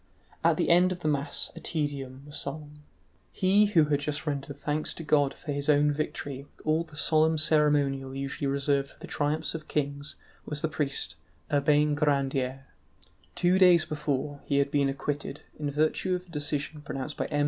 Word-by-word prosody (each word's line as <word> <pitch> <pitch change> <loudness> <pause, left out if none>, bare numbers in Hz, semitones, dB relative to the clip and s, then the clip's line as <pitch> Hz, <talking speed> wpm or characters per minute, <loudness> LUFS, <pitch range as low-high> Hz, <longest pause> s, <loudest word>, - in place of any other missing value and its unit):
At - - +4
the - - +2
end 180 +2 +5
of 180 -1 -5
the 155 - -1
mass 145 0 0
a - - -7
Te 155 -3 -1
Deum 135 -2 -6
was 145 0 -10
sung. 150 +1 -5 0.5
He 195 +3 +4
who 170 -7 +4
had 145 -1 +1
just 150 +1 -3
rendered 140 -1 -3
thanks 150 +1 -2
to 165 - -7
God 145 -3 +3
for 150 +1 -7
his 145 +1 -2
own 150 0 +5
victory 145 -2 -3 0.2
with - - -19
all 155 +2 +2
the 155 -2 -14
solemn 160 +1 +3
ceremonial 145 -3 +2
usually 140 +1 -3
reserved 140 0 +1
for - - -20
the - - -8
triumphs 150 +2 -1
of 155 -2 -7
kings 145 0 -2 0.3
was 150 0 -3
the - - +3
priest 140 - -2 0.4
Urbain 150 +1 +3
Grandier. 135 -3 0 0.7
Two 180 +2 +3
days 180 -3 +6
before, 145 -1 -2
he 140 - +1
had 140 0 +2
been 140 -2 +2
acquitted, 140 +1 -4 0.2
in 150 -1 -1
virtue 155 +5 +1
of 180 0 -6
a - - -23
decision 150 0 -2
pronounced 140 0 -5
by - - -2
M. 145 - -1
145 Hz, 190 wpm, -28 LUFS, 140-155 Hz, 0.7 s, days